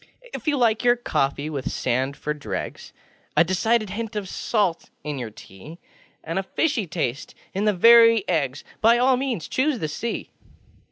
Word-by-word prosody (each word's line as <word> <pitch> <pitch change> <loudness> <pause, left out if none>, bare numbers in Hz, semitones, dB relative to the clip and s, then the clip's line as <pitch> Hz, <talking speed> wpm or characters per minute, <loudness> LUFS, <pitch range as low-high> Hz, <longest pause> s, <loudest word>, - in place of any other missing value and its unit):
If - - -7
you 295 -2 +2
like 230 -3 +2
your 240 0 +5
coffee 140 - -1
with 140 -4 -4
sand 130 +3 -1
for 150 +1 -3
dregs, 150 - -6 0.5
A - - +7
decided 210 +4 +1
hint 225 +1 -5
of 205 -2 -3
salt 195 -4 -1
in 150 -2 -4
your 120 -3 -5
tea, 105 - -13 0.5
And 165 +4 -2
a - - 0
fishy 230 - -1
taste 150 -4 -3 0.2
in 195 +2 -1
the 210 - +3
very 230 +2 +7
eggsŌĆö 145 -5 -1 0.2
By 230 +2 +5
all 255 +2 +4
means 250 - -3
choose 275 +1 0
the 155 - -3
Sea. 230 +10 -4
195 Hz, 170 wpm, -23 LUFS, 150-235 Hz, 0.5 s, A